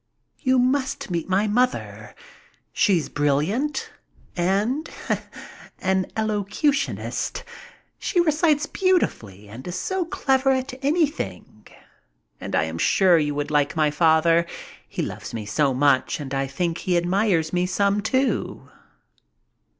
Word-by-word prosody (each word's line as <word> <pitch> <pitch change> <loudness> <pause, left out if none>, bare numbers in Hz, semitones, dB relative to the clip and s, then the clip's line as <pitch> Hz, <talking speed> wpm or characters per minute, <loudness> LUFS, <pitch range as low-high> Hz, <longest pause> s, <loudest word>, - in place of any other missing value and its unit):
You 260 -2 +2
must 260 -4 0
meet 170 +1 -2
my 195 +3 +2
mother. 250 +4 -1 0.6
She's 180 -7 +2
brilliant 155 - 0 0.4
and 205 - 0 0.9
an 190 0 0
elocutionist. 220 +7 -1 0.6
She 360 - 0
recites 310 -2 +2
beautifully, 110 - -1
and 115 +8 -10
is 175 - -4
so 380 -2 -2
clever 270 -4 +1
at 260 0 -2
anything. 280 - -2 0.7
And - - -4
I - - +3
am 80 +1 -4
sure 180 - +4
you 150 -1 -1
would 145 +1 -3
like 145 +1 +1
my 155 -2 +2
father. 165 +2 +3 0.4
He - - -3
loves - - -6
me 110 -2 -5
so 140 +7 +1
much 135 +3 +2
and 140 -2 -6
I 135 0 0
think 165 +5 -2
he 180 -2 +1
admires 175 -2 +1
me 180 0 +1
some, 200 +2 +1
too." 260 +5 -1
185 Hz, 125 wpm, -23 LUFS, -, 0.9 s, sure